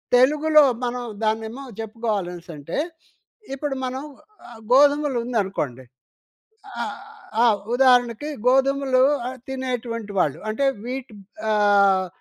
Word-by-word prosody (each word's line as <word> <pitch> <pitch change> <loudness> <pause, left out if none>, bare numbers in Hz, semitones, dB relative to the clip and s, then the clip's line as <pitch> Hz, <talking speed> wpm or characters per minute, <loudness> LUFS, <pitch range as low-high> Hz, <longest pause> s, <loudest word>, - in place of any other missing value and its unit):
తెలుగులో 300 +4 +5 0.2
మనం 245 0 -3 0.2
దాన్నేమో 220 +4 -2 0.2
జెప్పుకోవాలనేసి 205 -6 -4
అంటే, 145 +3 -6 0.8
ఇప్పుడు 275 0 -3
మనం 260 +2 -4 0.5
ఆహ్, 225 -2 -13
గోధుమలు 285 0 +4
ఉందనుకోండి 190 - -2 1.0
ఆహ్, - - -5 0.4
ఆ! - - +6 0.3
ఉదాహరణకి 250 +2 +3 0.2
గోధుమలు 270 0 +3 0.5
తినేటువంటి 245 -5 -4
వాళ్ళు. 150 -3 +1
అంటే 275 +6 0 0.2
వీట్ 255 -2 -5 0.4
ఆహ్, 200 -2 +4
245 Hz, 95 wpm, -23 LUFS, 210-265 Hz, 1.0 s, ఆ